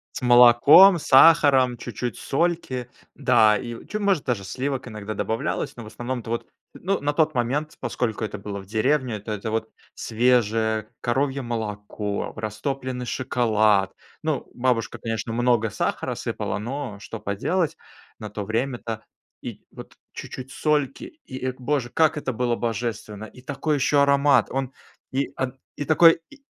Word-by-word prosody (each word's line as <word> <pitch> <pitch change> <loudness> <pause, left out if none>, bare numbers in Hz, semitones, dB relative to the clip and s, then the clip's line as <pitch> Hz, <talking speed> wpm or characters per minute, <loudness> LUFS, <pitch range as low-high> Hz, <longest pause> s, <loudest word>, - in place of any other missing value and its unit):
С - - -5
молоком, 125 +10 +8
сахаром, 135 -4 +5
чуть-чуть 120 +1 -5
сольки, 135 -6 -1 0.3
да, 115 -6 +4
и 120 +1 -7
чё, 210 - -4
может, 195 -7 +1
даже 120 -6 -1
сливок 130 +5 -3
иногда 105 -1 -6
добавлялось, 110 +4 -2
но 120 - -8
в - - -11
основном-то 120 0 -5
вот, 115 - -3 0.3
ну, 195 +2 -2
на 145 +1 0
тот 155 0 +2
момент, 135 +6 -1
поскольку 115 -2 -2
это 105 - -4
было 100 0 -6
в 95 - -10
деревне, 125 +3 0
это 105 -3 -4
вот 110 0 -1 0.3
свежее 110 -2 +1
коровье 135 +3 0
молоко, 105 -3 -4
растопленный 125 +3 -4
шоколад. 110 -6 +1 0.3
Ну, - - -2
бабушка, 120 -2 -1
конечно, 115 0 -4
много 120 -2 +2
сахара - - -2
сыпала, - - -3
но 120 -1 -5
что 115 - -8
поделать, 155 - -1 0.4
на 105 -2 -7
то 105 -1 -5
время-то, 115 0 -3 0.4
и - - -8
вот, - - -12 0.2
чуть-чуть 130 0 -8
сольки. 150 -2 0 0.2
И, 130 -1 -6
о 130 - -2
боже, 130 -1 -1
как 155 +2 +2
это 135 -3 -3
было 120 0 0
божественно! 110 -2 -4
И 125 +3 -13
такой 150 +3 -1
ещё 145 +1 +2
аромат! 140 0 +4
Он, 135 0 -3 0.4
и 135 +1 -1
он 130 0 -3 0.2
и 145 - -4
такой 165 +1 +6
и 290 - -14
125 Hz, 150 wpm, -24 LUFS, 110-140 Hz, 0.4 s, молоком